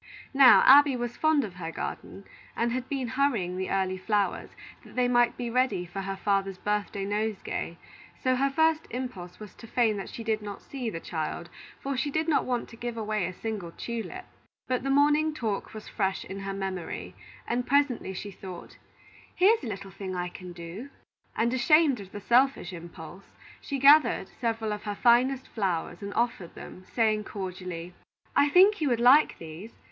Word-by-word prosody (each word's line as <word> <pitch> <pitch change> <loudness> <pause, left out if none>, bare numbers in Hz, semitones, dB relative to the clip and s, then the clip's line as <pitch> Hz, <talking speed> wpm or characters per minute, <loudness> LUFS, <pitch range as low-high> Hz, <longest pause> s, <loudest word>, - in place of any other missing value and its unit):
Now, 270 -2 +8
Abby 280 0 +8
was 240 -1 -4
fond 310 -2 +3
of 200 -5 -6
her 170 -2 -6
garden, 195 - -6 0.3
and 235 0 0
had 255 +1 -3
been 270 -3 -2
hurrying 235 -9 0
the 190 0 -3
early 190 -1 0
flowers, 205 -2 0 0.3
that - - -15
they 250 -1 +2
might 240 -1 +3
be 245 - -3
ready 255 -7 +1
for 185 +3 -6
her 195 0 -4
father's 195 -1 0
birthday 205 0 -2
nosegay; 205 -4 -3 0.5
so 255 0 +3
her 275 +2 +2
first 320 +2 +2
impulse 200 -8 -6
was 210 -3 -10
to 230 - -13
feign 225 -3 +1
that 195 - -6
she 230 - -7
did 220 -1 0
not 205 -1 -8
see 255 -4 -4
the 165 - -5
child, 165 +1 -5 0.3
for 275 0 -2
she 260 +3 -1
did 315 +3 -1
not 315 - +2
want 245 -2 -2
to - - -12
give 235 0 -5
away 215 -4 -1
a - - -4
single 210 -3 -5
tulip. 235 +11 -6 0.4
But 255 -1 0
the 275 - -3
morning 295 +2 +3
talk 220 -7 -3
was 215 -1 -9
fresh 190 -2 -2
in 195 - -7
her 195 0 -4
memory, 190 -3 -5 0.3
and 245 +1 -1
presently 265 -8 +1
she 205 +2 -6
thought: 185 -2 -10 0.6
"Here 390 +5 +6
is 440 - -10
a - - -4
little 195 -2 -6
thing 190 0 -6
I 180 0 -2
can 180 0 -10
do;" 175 +9 -8 0.5
and 235 +2 +1
ashamed 280 +1 +4
of 195 -1 -10
the 205 - -7
selfish 240 -4 +2
impulse, 170 +2 -11 0.3
she 280 - -3
gathered 285 +3 +5
several 225 -3 -2
of 210 - -6
her 205 -1 -3
finest 250 +3 +3
flowers 190 -6 -2
and 200 0 -5
offered 235 -8 -1
them, 185 - -11
saying 215 -2 +1
cordially: 180 -3 -6 0.4
"I 290 - +4
think 380 +4 +5
you 295 - +2
would 240 -2 +1
like 255 +6 +6
these. 165 +7 -10
220 Hz, 190 wpm, -28 LUFS, 190-255 Hz, 0.6 s, Now